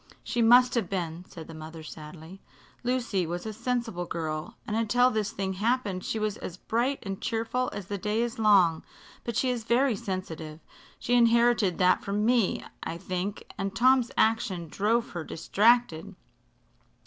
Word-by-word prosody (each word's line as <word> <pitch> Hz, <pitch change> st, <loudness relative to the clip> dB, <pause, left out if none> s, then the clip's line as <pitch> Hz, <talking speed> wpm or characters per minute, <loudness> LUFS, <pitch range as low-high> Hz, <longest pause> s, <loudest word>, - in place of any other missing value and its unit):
"She 240 Hz, -, -1 dB
must 245 Hz, +2 st, +6 dB
have 225 Hz, -7 st, 0 dB
been," 175 Hz, -2 st, -3 dB
said 160 Hz, -2 st, -10 dB
the 165 Hz, -, -9 dB
mother, 160 Hz, +1 st, -9 dB
sadly. 160 Hz, +4 st, -10 dB, 0.4 s
"Lucy 240 Hz, -8 st, 0 dB
was 175 Hz, +3 st, -4 dB
a 220 Hz, -, -4 dB
sensible 230 Hz, -6 st, -2 dB
girl, 160 Hz, +6 st, -4 dB
and 215 Hz, -, -3 dB
until 245 Hz, +3 st, +3 dB
this 215 Hz, -3 st, -1 dB
thing 190 Hz, -1 st, -3 dB
happened 205 Hz, -2 st, -1 dB
she -, -, -2 dB
was 215 Hz, 0 st, -1 dB
as 175 Hz, -, -7 dB
bright 245 Hz, +8 st, 0 dB
and 195 Hz, -2 st, -5 dB
cheerful 235 Hz, +2 st, -1 dB
as 205 Hz, -, -6 dB
the 200 Hz, +1 st, -4 dB
day 210 Hz, +3 st, 0 dB
is 240 Hz, -1 st, -4 dB
long. 190 Hz, -7 st, +4 dB, 0.4 s
But 235 Hz, -, -4 dB
she 255 Hz, +2 st, +2 dB
is 240 Hz, -2 st, -3 dB
very 240 Hz, +2 st, +2 dB
sensitive 165 Hz, -6 st, -5 dB, 0.4 s
she 245 Hz, -, -2 dB
inherited 235 Hz, -5 st, +4 dB
that 180 Hz, 0 st, +3 dB
from 205 Hz, +2 st, -1 dB
me, 235 Hz, -4 st, +2 dB, 0.2 s
I 165 Hz, -, -4 dB
think 185 Hz, +3 st, -4 dB, 0.2 s
and 195 Hz, 0 st, -3 dB
Tom's 255 Hz, +1 st, +4 dB
action 210 Hz, -7 st, +1 dB
drove 225 Hz, +7 st, 0 dB
her 170 Hz, -2 st, -4 dB
distracted. 210 Hz, 0 st, +2 dB
210 Hz, 165 wpm, -28 LUFS, 180-235 Hz, 0.4 s, must